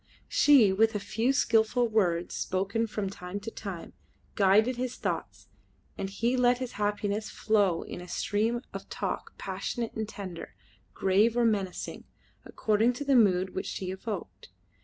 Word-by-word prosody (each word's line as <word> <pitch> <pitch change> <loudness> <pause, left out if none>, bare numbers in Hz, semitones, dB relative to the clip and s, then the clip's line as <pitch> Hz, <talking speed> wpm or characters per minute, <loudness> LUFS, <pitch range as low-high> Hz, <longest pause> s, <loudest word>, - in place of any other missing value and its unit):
She, 255 -10 +6
with 220 +2 +3
a - - 0
few 225 +5 0
skilful 235 -2 +3
words 180 -6 +1
spoken 195 +5 -1
from 210 -2 -3
time 190 0 -6
to 225 +3 -6
time, 195 -7 -7 0.4
guided 210 +5 +4
his 250 0 -3
thoughts, - - -4 0.5
and 195 - -4
he 230 +6 0
let 245 -1 +4
his 255 -1 -5
happiness 205 +1 -1
flow 205 -6 +1
in 180 - -7
a 180 - -10
stream 220 +6 -1
of - - -7
talk - - -4
passionate 235 -2 -4
and 220 -1 -4
tender, 185 -6 -8 0.4
grave 210 +5 +3
or 240 - +4
menacing, 200 -5 -2 0.4
according 220 +3 +1
to 285 +4 -6
the 275 -1 +3
mood 190 -5 +3
which 190 - -3
she 185 -1 -4
evoked. 190 - -6
210 Hz, 155 wpm, -29 LUFS, 190-230 Hz, 0.5 s, She